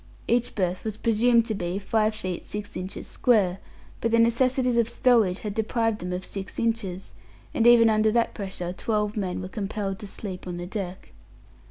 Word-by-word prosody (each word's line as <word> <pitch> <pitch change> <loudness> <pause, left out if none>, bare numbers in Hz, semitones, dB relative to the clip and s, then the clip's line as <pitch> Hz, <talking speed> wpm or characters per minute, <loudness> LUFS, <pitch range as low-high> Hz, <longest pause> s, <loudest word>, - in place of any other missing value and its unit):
Each 240 +1 +1
berth 185 -2 -1
was 215 -1 -4
presumed 230 +1 +3
to 225 - -2
be 180 -2 -3
five 215 +2 +1
feet 185 -5 -4
six 210 0 -6
inches 185 +1 -5
square, 195 -7 +2 0.4
but 230 - 0
the 230 - +3
necessities 250 +2 +3
of 235 -1 +2
stowage 225 -9 +3
had 210 -2 -4
deprived 225 0 0
them 180 +1 -5
of 180 +1 -3
six 195 -2 -7
inches, 215 -5 -2 0.4
and 230 - +3
even 235 -1 +8
under 215 0 +3
that 235 +1 +1
pressure 190 -4 -5
twelve 210 +2 -1
men 185 -4 -2
were 185 - -5
compelled 195 -1 -4
to 205 - -8
sleep 190 -2 -7
on 175 -1 -4
the 175 - -5
deck. 190 -1 -6
210 Hz, 185 wpm, -26 LUFS, 185-230 Hz, 0.4 s, even